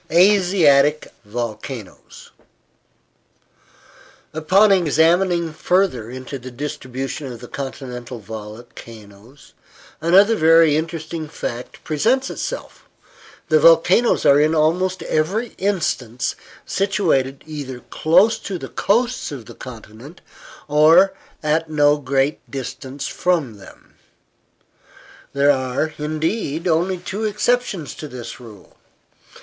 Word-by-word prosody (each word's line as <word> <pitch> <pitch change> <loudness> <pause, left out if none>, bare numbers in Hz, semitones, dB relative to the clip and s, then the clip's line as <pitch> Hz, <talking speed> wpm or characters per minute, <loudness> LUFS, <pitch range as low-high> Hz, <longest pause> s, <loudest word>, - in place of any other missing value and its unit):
ASIATIC 170 -6 +4
INLAND 105 - -21
VOLCANOES 115 -1 -7 2.0
Upon 185 +7 +4
examining 170 0 +2
further 165 - 0
into 130 +2 -7
the 125 +1 -9
distribution 135 +1 -5
of 120 - -9
the 120 - -10
continental 125 -3 -7
volcanoes, 110 +2 -12 0.5
another 195 +7 +5
very 165 -3 +5
interesting 160 0 -4
fact 125 -5 -7
presents 235 - 0
itself. - - -6 0.6
The 155 -1 +5
volcanoes 165 +9 +4
are 140 0 +6
in 155 +2 +2
almost 180 +4 +1
every 195 +10 -1
instance 145 - -1 0.3
situated 160 -10 0
either 140 -5 -7
close 185 +8 +3
to 195 - -5
the - - -8
coasts 235 -1 0
of 130 -6 -8
the - - -11
continent, 120 +5 -12 0.5
or 160 +6 +5 0.3
at 155 +1 0
no 145 -1 +3
great 135 +1 0
distance 135 +1 -6
from 155 - -1
them. 95 - -16 1.4
There 140 +1 +4
are, 130 +3 -1
indeed, 155 +2 -2
only 175 +3 +1
two 195 +5 -5
exceptions 210 - -1
to 155 - -8
this 125 -3 -9
rule. 110 -6 -15
155 Hz, 105 wpm, -20 LUFS, 130-180 Hz, 2.0 s, are